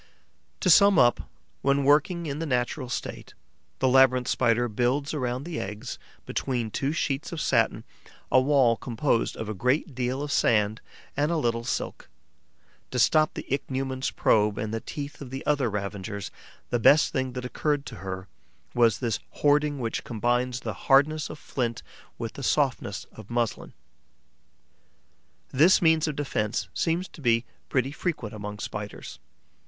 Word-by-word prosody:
To 185 Hz, -, +2 dB
sum 200 Hz, +2 st, +7 dB
up, 120 Hz, -4 st, +3 dB, 0.3 s
when 140 Hz, 0 st, +2 dB
working 155 Hz, +5 st, +3 dB
in 145 Hz, -1 st, -4 dB
the 165 Hz, -, -3 dB
natural 125 Hz, 0 st, -1 dB
state, -, -, -5 dB, 0.4 s
the 130 Hz, -, +1 dB
Labyrinth 130 Hz, -1 st, +5 dB
Spider 120 Hz, -1 st, +2 dB
builds 125 Hz, +6 st, 0 dB
around 125 Hz, -3 st, -2 dB
the 165 Hz, 0 st, -4 dB
eggs, 105 Hz, +6 st, -6 dB, 0.3 s
between 120 Hz, -5 st, -2 dB
two 135 Hz, +5 st, -1 dB
sheets 150 Hz, 0 st, -2 dB
of 170 Hz, -, -4 dB
satin, -, -, +1 dB, 0.5 s
a 130 Hz, -, +6 dB
wall 130 Hz, -4 st, +4 dB
composed 120 Hz, 0 st, 0 dB
of 110 Hz, -, -5 dB
a 110 Hz, -, -3 dB
great 130 Hz, -, 0 dB
deal 130 Hz, +2 st, -2 dB
of 145 Hz, -, -4 dB
sand 110 Hz, -3 st, +2 dB, 0.3 s
and 145 Hz, +3 st, +1 dB
a 170 Hz, -, +1 dB
little 115 Hz, -5 st, 0 dB
silk. 125 Hz, -, -4 dB, 0.8 s
To 125 Hz, -, -4 dB
stop 155 Hz, +5 st, +4 dB
the -, -, -6 dB
Ichneumon's 130 Hz, -1 st, -2 dB
probe 105 Hz, -1 st, +2 dB
and 105 Hz, +1 st, -3 dB
the 115 Hz, -, -1 dB
teeth 145 Hz, +4 st, -7 dB
of 135 Hz, -, -7 dB
the 135 Hz, +1 st, -6 dB
other 140 Hz, -5 st, +2 dB
ravagers, 100 Hz, 0 st, -4 dB, 0.4 s
the 120 Hz, -, +1 dB
best 145 Hz, +6 st, +5 dB
thing 130 Hz, -1 st, -1 dB
that 125 Hz, 0 st, -5 dB
occurred 145 Hz, +2 st, -1 dB
to 115 Hz, -, -8 dB
her 95 Hz, +1 st, -6 dB, 0.5 s
was 115 Hz, -4 st, +4 dB
this 115 Hz, -4 st, -1 dB
hoarding 145 Hz, 0 st, +2 dB
which 115 Hz, -4 st, -3 dB
combines 120 Hz, +2 st, -1 dB
the -, -, -4 dB, 0.2 s
hardness 145 Hz, +3 st, +4 dB
of -, -, -7 dB
flint 120 Hz, -5 st, -3 dB, 0.3 s
with -, -, -5 dB
the -, -, -8 dB
softness -, -, 0 dB
of 110 Hz, -2 st, -13 dB
muslin. 120 Hz, -2 st, -2 dB, 1.8 s
This 160 Hz, +8 st, +5 dB
means 160 Hz, -2 st, +3 dB
of 150 Hz, -, -2 dB
defence 105 Hz, -8 st, -2 dB
seems 170 Hz, +2 st, 0 dB
to 155 Hz, -, -14 dB
be 115 Hz, -2 st, +2 dB, 0.2 s
pretty 130 Hz, 0 st, +1 dB
frequent 145 Hz, -, -3 dB
among 105 Hz, -1 st, -6 dB
Spiders. 105 Hz, -1 st, -7 dB
130 Hz, 160 wpm, -26 LUFS, 115-145 Hz, 1.8 s, sum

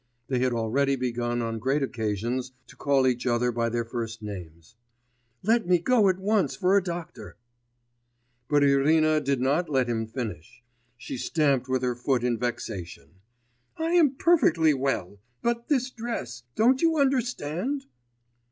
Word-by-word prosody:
(They 130 Hz, -2 st, +1 dB
had 130 Hz, 0 st, +1 dB
already 125 Hz, +5 st, +1 dB
begun 120 Hz, -1 st, -2 dB
on 115 Hz, -1 st, -3 dB
great 135 Hz, +5 st, 0 dB
occasions 120 Hz, +2 st, -2 dB
to -, -, -16 dB
call 140 Hz, -2 st, +2 dB
each 125 Hz, 0 st, 0 dB
other 120 Hz, 0 st, +1 dB
by 115 Hz, 0 st, -1 dB
their 120 Hz, 0 st, -2 dB
first 115 Hz, -2 st, -5 dB
names.) 90 Hz, -2 st, -9 dB, 0.7 s
'Let 225 Hz, 0 st, +2 dB
me 180 Hz, 0 st, +5 dB
go 210 Hz, +3 st, +3 dB
at 185 Hz, -, +1 dB
once 195 Hz, -5 st, +1 dB
for 190 Hz, 0 st, +2 dB
a 200 Hz, -, +5 dB
doctor.' 175 Hz, -2 st, -7 dB, 1.1 s
But 145 Hz, -1 st, +4 dB
Irina 155 Hz, +3 st, +3 dB
did 140 Hz, -2 st, 0 dB
not 145 Hz, +7 st, +1 dB
let 130 Hz, -4 st, +1 dB
him 115 Hz, -2 st, -2 dB
finish; 110 Hz, -, -7 dB, 0.3 s
she 125 Hz, -, -6 dB
stamped 140 Hz, -2 st, +1 dB
with 130 Hz, 0 st, 0 dB
her 125 Hz, -1 st, +1 dB
foot 125 Hz, 0 st, -1 dB
in 120 Hz, -2 st, 0 dB
vexation. 95 Hz, -, -5 dB, 0.6 s
'I 325 Hz, +1 st, -1 dB
am 320 Hz, -6 st, +4 dB
perfectly 230 Hz, -, +4 dB
well... 130 Hz, -8 st, -2 dB, 0.2 s
but 235 Hz, 0 st, -1 dB
this 260 Hz, -3 st, +1 dB
dress... 220 Hz, -, -5 dB
don't 255 Hz, +4 st, +3 dB
you 330 Hz, -1 st, +3 dB
understand? 255 Hz, -, -1 dB
135 Hz, 150 wpm, -26 LUFS, 120-185 Hz, 1.1 s, me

